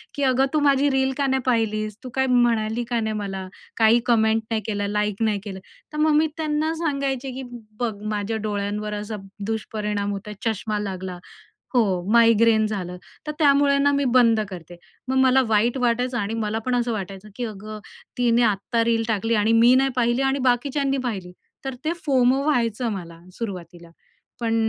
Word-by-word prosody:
की, 285 - -2
"अगं 260 0 +3
तू 305 - +3
माझी 280 +1 +4
रील 265 0 +1
का 280 - +1
नाही 265 0 +1
पाहिलीस? 215 -3 0
तू 255 - -6
काय 265 0 +2
म्हणाली 240 -2 +2
का 240 - 0
नाही 220 -1 -1
मला? 195 -2 -4 0.3
काही 225 +1 +5
कमेंट 225 -2 +3
नाही 220 - 0
केलं? 205 -2 -2
लाईक 210 0 -1
नाही 210 -2 +1
केलं?" 195 -3 -7 0.3
तर - - -5
मग 310 +1 +3
मी 315 - +3
त्यांना 310 0 0
सांगायचे 275 -5 -2
की, 265 +1 -6 0.4
"बघ 240 -3 -1 0.2
माझ्या 210 +1 -2
डोळ्यांवर 210 0 -2
असा 210 +1 -4 0.3
दुष्परिणाम 210 -2 -2
होता 200 +1 -6
चष्मा 215 -1 -1
लागला. 190 -3 -5 0.6
हो 245 - +5 0.3
मायग्रेन 230 -1 +5
झालं. 185 -4 -4 0.3
तर 300 - -2
त्यामुळे 280 -1 +4
ना 285 +1 +3
मी 280 0 +1
बंद 230 -3 +4
करते." 175 -1 -9 0.3
मग 260 - 0
मला 260 0 +5
वाईट 225 +4 +2
वाटायचं 245 0 0
आणि 205 +1 -2
मला 210 +1 -1
पण 255 - +1
असं 240 -1 0
वाटायचं 195 -1 -6
की, 245 - -3
"अगं 215 -1 -7 0.4
तिने 240 -1 +3
आत्ता 220 +3 -1
रील 230 -1 +2
टाकली 225 +1 0
आणि 215 +1 +2
मी 245 +2 +7
नाही 270 0 +3
पाहिली 240 +1 +2
आणि 270 +1 +1
बाकीच्यांनी 275 +2 0
पाहिली." 190 -6 -5 0.3
तर 270 -1 -3
ते 320 - +1
FOMO 260 0 +3
व्हायचं 240 -5 +1
मला 170 -4 -8 0.2
सुरुवातीला. 175 -6 -7 0.5
पण 230 -1 0
230 Hz, 175 wpm, -23 LUFS, 210-260 Hz, 0.6 s, मी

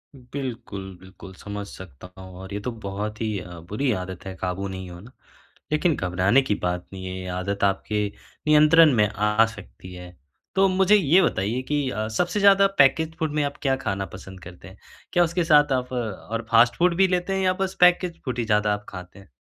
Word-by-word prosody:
बिल्कुल, 120 -7 -7
बिल्कुल। 95 0 -13
समझ 100 +1 -7
सकता 90 -3 -12
हूँ। 95 -1 -11
और 95 +1 -9
ये 100 - -3
तो 120 +4 -4
बहुत 105 0 -6
ही 110 -2 -1
अ, 90 -1 -10
बुरी 105 +11 -2
आदत 90 0 -8
है 95 -1 -6
काबू 95 +2 -3
नहीं 95 -1 -7
होना। 90 +8 -12 0.6
लेकिन 155 +1 +2
घबराने 95 +7 +2
की 105 -6 -1
बात 90 0 -2
नहीं 95 -1 -7
है 95 0 -5
ये 90 0 -7
आदत 100 +2 -3
आपके 105 +1 0 0.4
नियंत्रण 155 0 +6
में 105 -2 +4
आ 105 +1 +2
सकती 90 - -11
है 90 0 -11 0.4
तो 195 0 +4
मुझे 190 +2 +4
ये 185 -1 +4
बताइए 115 - 0
कि 145 0 -1
अ, 110 -2 -3
सबसे 175 - -1
ज़्यादा 195 0 +6
पैकेज़्ड 160 +4 +3
फूड 155 -3 -1
में 150 - +1
आप 140 0 -4
क्या 135 -2 +1
खाना 95 0 -2
पसंद 95 -1 -11
करते 90 +1 -12
हैं? 95 - -14 0.4
क्या 175 - +4
उसके 170 +1 0
साथ 150 -3 +4
आप 125 -1 -2
और 115 -1 -4
फ़ास्ट 115 +1 +5
फूड 175 0 +2
भी 195 0 +5
लेते 180 +1 -1
हैं 190 - 0
या 185 - +3
बस 190 0 -4
पैकेज़्ड 180 -1 +4
फूड 125 -3 -3
ही 115 - -1
ज़्यादा 105 -1 +2
आप 105 0 -6
खाते 90 +1 -10
हैं? 95 - -18
110 Hz, 205 wpm, -24 LUFS, 95-150 Hz, 0.6 s, नियंत्रण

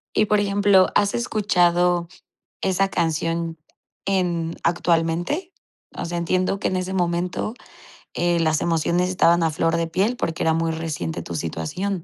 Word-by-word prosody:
Y, 215 - +4
por 210 0 +2
ejemplo, 200 -1 +4
¿has 205 -1 +3
escuchado 180 -6 +2 0.5
esa 195 +1 +1
canción 165 0 -1 0.5
en 175 -4 0
actualmente? 175 - 0 0.5
O - - -3
sea, 175 +1 -3
entiendo 185 +3 0
que - - 0
en 185 - -1
ese 185 +1 -3
momento, 175 +3 -1 0.6
eh, 175 0 +1
las 155 -1 +2
emociones 170 +2 +1
estaban 170 -2 +3
a 160 - +2
flor 165 +2 +1
de 165 0 -1
piel, 200 +9 0
porque 165 -8 -2
era 160 - +3
muy 165 0 0
reciente 150 - -4
tu 85 - -6
situación. 160 - -3
175 Hz, 150 wpm, -22 LUFS, 165-190 Hz, 0.6 s, Y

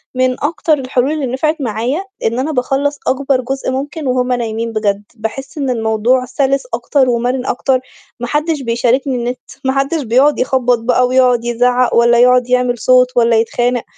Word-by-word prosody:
من 255 0 0
أكتر 315 +1 0
الحلول 255 +1 0
اللي 305 -3 -2
نفعت 285 +6 -1
معايا 245 - -2 0.2
إن 230 +3 0
أنا 300 +4 -1
باخلَّص 280 +2 -1
أكبر 270 0 +1
جزء 265 +1 -3
ممكن 285 +3 -4
وهُم 250 0 0
نايمين 230 -1 -3
بجد، 205 -1 -1
باحس 240 +7 -6
إن 275 -3 -2
الموضوع 230 +2 +1
سلس 270 +2 0
أكتر 265 -3 +1
ومرن 245 +2 -1
أكتر، 260 +1 0 0.4
ما 245 - -4
حدش 300 +2 -1
بيشاركني 250 +2 0
النت 245 +1 -3 0.3
ما 265 - +1
حدش 275 +3 0
بيقعد 260 +6 +2
يخبّط 250 -2 +1
بقى 250 +2 +2
ويقعد 250 -2 +2
يزعّق 245 +1 +1
والّا 235 0 +4
يقعد 250 0 +4
يعمل 250 -1 +1
صوت 255 +1 +4
والّا 230 -1 +4
يتخانق، 240 +1 0
250 Hz, 165 wpm, -15 LUFS, 240-270 Hz, 0.4 s, والّا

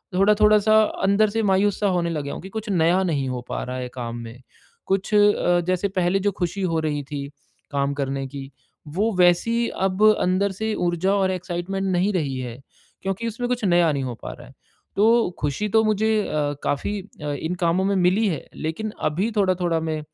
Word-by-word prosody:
थोड़ा-थोड़ा 210 +2 +5
सा 215 +1 +5 0.2
अंदर 200 +2 +3
से 225 +1 -1
मायूस 195 +1 +2
सा 205 - +3
होने 175 -2 0
लग 150 -3 -2
गया 140 - -5
हूँ - - -7
कि 190 - -8
कुछ 220 +1 -6
नया 175 0 +3
नहीं 145 -7 -1
हो 125 -1 -3
पा - - -3
रहा 125 0 -5
है 125 -1 -4
काम 120 -2 -5
में, 115 +2 -9 0.4
कुछ 195 +2 -1
अ, 205 -4 +4
जैसे 185 +2 +1
पहले 185 0 +1
जो 205 +1 +1
खुशी 180 +3 -2
हो 160 - +1
रही 145 -2 -2
थी, 140 0 -5 0.5
काम 140 0 0
करने 135 -1 -2
की 135 0 -8 0.4
वो 215 +3 +1
वैसी 205 +7 +3
अब 190 +2 -1 0.2
अंदर 190 +2 +1
से 220 +2 -2
ऊर्जा 175 +2 0
और 190 -1 +2
एक्साइटमेंट 180 +2 -3
नहीं 185 +3 +2
रही 145 -7 -1
है, 125 0 -6 0.4
क्योंकि 195 +4 -2
उसमें 240 +2 -3
कुछ 245 -2 -1
नया 175 -3 +4
नहीं 140 - -2
हो 125 -2 -3
पा - - -5
रहा - - -13
है। - - -16 0.4
तो 225 +2 +4
खुशी 145 +9 -1
तो 220 +2 +4
मुझे 215 +1 +2
अ, 145 -1 -1
काफ़ी 200 +8 -1 0.2
अ, 145 - -2
इन 160 +5 -3
कामों 170 +3 +2
में 200 0 +1
मिली 190 +4 +3
है 160 - -4
लेकिन 165 +8 -4 0.2
अभी 190 +9 -1
थोड़ा-थोड़ा 180 -4 +1
मैं 160 -1 -2
185 Hz, 205 wpm, -23 LUFS, 155-205 Hz, 0.5 s, थोड़ा-थोड़ा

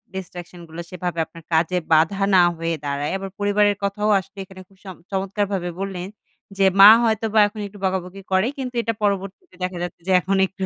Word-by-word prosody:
distraction 180 -1 -8
গুলা 165 +2 -7
সেভাবে 180 -2 -4
আপনার 165 +1 -15
কাজে 165 +3 +2 0.2
বাধা 165 +6 +3
না 180 - +7 0.2
হয়ে 165 0 -2
দাঁড়ায়। 140 +1 -2
আবার 195 0 -6
পরিবারের 205 0 +2
কথাও 210 +2 -1
আসলে 195 +2 -14
এখানে 185 0 -13
খুব 195 - -25
সম 190 -2 -8 0.2
চমৎকারভাবে 195 -1 -2
বললেন 190 -2 -4 0.5
যে, 195 - +3 0.2
মা 200 - +12
হয়তোবা 220 -1 +1
এখন 210 +1 -10
একটু 205 - -14
বকাবকি 190 0 -3
করে 190 +4 +2
কিন্তু 255 -2 -5
এটা 230 0 -2
পরবর্তীতে 200 - -3
দেখা 180 0 -3
যাচ্ছে 175 -1 -7
যে, - - +1
এখন 195 +2 0
একটু 195 0 -5
190 Hz, 185 wpm, -22 LUFS, 180-205 Hz, 0.5 s, মা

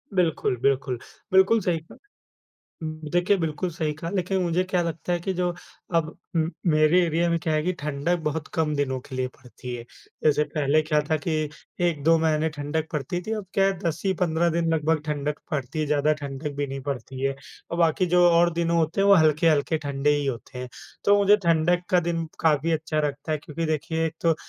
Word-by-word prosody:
बिल्कुल, 165 -8 +1
बिल्कुल। 135 -2 +1 0.3
बिल्कुल 190 +4 +5
सही 175 -3 0
कहा। 160 - -16 1.1
देखिए, 175 +3 +3
बिल्कुल 165 +1 -2
सही 160 -2 -2
कहा 165 +3 -6
लेकिन 190 0 0
मुझे 175 +1 +1
क्या 180 -1 +2
लगता 170 +1 -3
है 175 - 0
कि 190 +3 -2
जो 180 0 0 0.5
अब 165 -2 +2 0.3
उम, 160 0 +2 0.2
मेरे 155 +4 +4
एरिया 170 +1 +1
में 170 - +2
क्या 160 -1 -1
है 155 - +2
कि 180 +2 0
ठंडक 150 +4 -1
बहुत 150 0 -3
कम 155 -2 +1
दिनों 130 -2 -1
के 130 - -10
लिए 130 0 0
पड़ती 125 -1 -9
है। 120 - -7 0.4
जैसे 150 -1 +4
पहले 150 0 +1
क्या 155 -1 +1
था 155 - +3
कि 170 - 0 0.6
1-2 165 0 +3
महीने 160 0 +1
ठंडक 150 +2 -2
पड़ती 150 +4 -2
थी, 215 - -6
अब 210 -3 -4
क्या 195 - +3
है 195 -1 +1
10 165 -1 -2
ही 190 - +3
15 170 0 +2
दिन 165 -1 +1
लगभग 160 0 +1
ठंडक 150 -1 -2
पड़ती 145 +1 -3
है, 155 - +1
ज़्यादा 150 +1 +2
ठंडक 140 +1 -4
भी 145 0 -1
नहीं 135 0 -5
पड़ती 130 0 -5
है। 135 0 +1 0.4
अ, - - -1
बाकी 170 +1 +2
जो 180 - +6
और 170 0 +4
दिन 170 0 0
होते 170 +2 +1
हैं 200 - +3
वो 200 - +8
हल्के-हल्के 155 -1 +3
ठंडे 140 +1 0
ही 145 -1 -1
होते 125 -1 -5
हैं, 125 0 -5 0.4
तो 205 0 +6
मुझे 205 +1 +6
ठंडक 170 +2 +3
का 180 - +4
दिन 165 -1 -1
काफ़ी 160 0 +2
अच्छा 155 -1 0
लगता 145 +2 -6
है, 155 - +1
क्योंकि 150 +2 -5
देखिए 160 +1 -1
एक 160 0 -3
तो 165 -1 +3
160 Hz, 210 wpm, -25 LUFS, 145-170 Hz, 1.1 s, वो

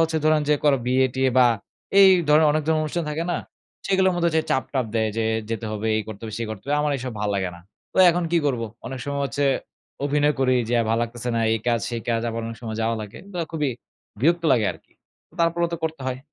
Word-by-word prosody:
হচ্ছে 160 0 +2
ধরেন 155 0 +4
যে 150 - +5
কারো 145 -2 +4
বিয়ে-টিয়ে 130 +1 +2
বা 125 - +7 0.5
এই 195 - +9 0.2
ধরনের 155 +1 +6
অনেক 155 0 +1
ধরনের 160 -1 +2
অনুষ্ঠান 165 +2 -2
থাকে 160 +3 -2
না? 170 - 0 0.5
সেগুলোর 190 -1 +3
মধ্যে 170 -1 +2
হচ্ছে 160 -1 +1
চাপ-টাপ 130 -1 0
দেয় 110 -1 +2
যে, 115 - 0 0.3
"যেতে 115 0 -3
হবে, 110 +1 -3
এই 110 - 0
করতে 110 0 -8
হবে, 110 -1 -6
সেই 115 - -3
করতে 110 -3 -7
হবে।" 145 - +1
আমার 150 -1 +1
এসব 125 -1 -5
ভাল 105 - 0
লাগে 95 -2 -1
না। - - -15 0.3
তো - - -13
এখন 175 +1 -1
কি 170 - +4
করব? 125 -5 0 0.3
অনেক 130 0 -5
সময় 140 0 -3
হচ্ছে 140 +1 -1 0.6
অভিনয় 145 +1 +2
করি 130 -1 +3 0.2
যে, 120 - +2 0.2
"ভাল 115 - +2
লাগতেছে 120 +1 -5
না, 115 - +1
এই 115 - +1
কাজ, 115 -1 +2
সেই 120 -1 -3
কাজ।" 115 -1 +1
আবার 115 0 -3
অনেক 115 0 -6
সময় 110 -1 -4
যাওয়া 115 +1 0
লাগে। 105 -1 -8 0.2
বা 175 - -2
খুবই 150 -4 0 0.5
বিরক্ত 170 +5 +3
লাগে 110 -5 +3
আরকি। - - -20 0.5
তারপরেও 170 0 +2
তো - - -3
করতে 160 -2 -3
হয়। 130 0 -2
130 Hz, 230 wpm, -23 LUFS, 115-155 Hz, 0.6 s, এই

